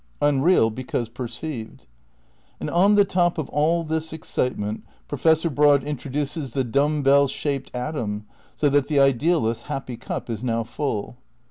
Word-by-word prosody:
Unreal, 145 -3 +3
because 120 -1 -3
perceived. 120 - -6 0.7
And - - -4
on 195 +4 +4
the 205 -1 +6
top 175 -3 +1
of 155 - -3
all 165 +3 +1
this 160 0 -2
excitement 125 -8 -3 0.2
Professor 160 +3 +2
Broad 145 -2 +4
introduces 145 -1 -4
the 135 - +1
dumb 145 +4 +1
bell 140 +1 +5
shaped 135 0 -3
atom, 120 -6 -3 0.3
so 150 - +2
that 140 0 +2
the 145 -2 +2
ideal 140 +3 +3
ist 115 0 -1
's - - -16
happy 130 -3 -4
cup 120 - -5
is 115 -1 -4
now 115 -2 0
full. 120 -1 -4
140 Hz, 155 wpm, -23 LUFS, 125-155 Hz, 0.7 s, the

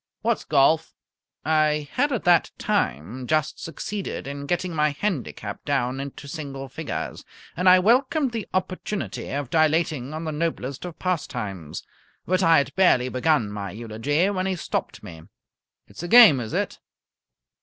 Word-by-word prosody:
"What's 230 0 0
golf?" 155 +3 +3 0.5
I 155 -1 +2
had 285 +3 +1
at 245 - -1
that 175 -1 +4
time 115 - -2
just 155 +1 0
succeeded 195 +5 -5
in 140 +1 -6
getting 175 +1 -1
my 150 -1 +2
handicap 140 - -4
down 135 -2 -1
into 140 +1 -7
single 140 -3 -6
figures, - - -5 0.3
and 180 +2 +4
I 185 - +8
welcomed 260 - +2
the 225 -3 -4
opportunity 185 +2 -3
of 140 -2 -4
dilating 155 -4 +1
on 160 - -4
the 160 - -3
noblest 150 -3 -3
of 170 -2 -8
pastimes. 105 - -4 0.4
But 185 +1 +1
I 165 -3 +6
had 140 -1 0
barely 130 -10 +4
begun 130 -4 +1
my 100 -1 -5
eulogy 115 - -1
when 185 -1 -1
he 190 - 0
stopped 170 - -4
me. 80 -2 -10 0.6
"It's - - -11
a 175 - -4
game, 220 - +8
is 110 -3 -5
it?" - - -2
155 Hz, 155 wpm, -24 LUFS, 130-180 Hz, 0.6 s, I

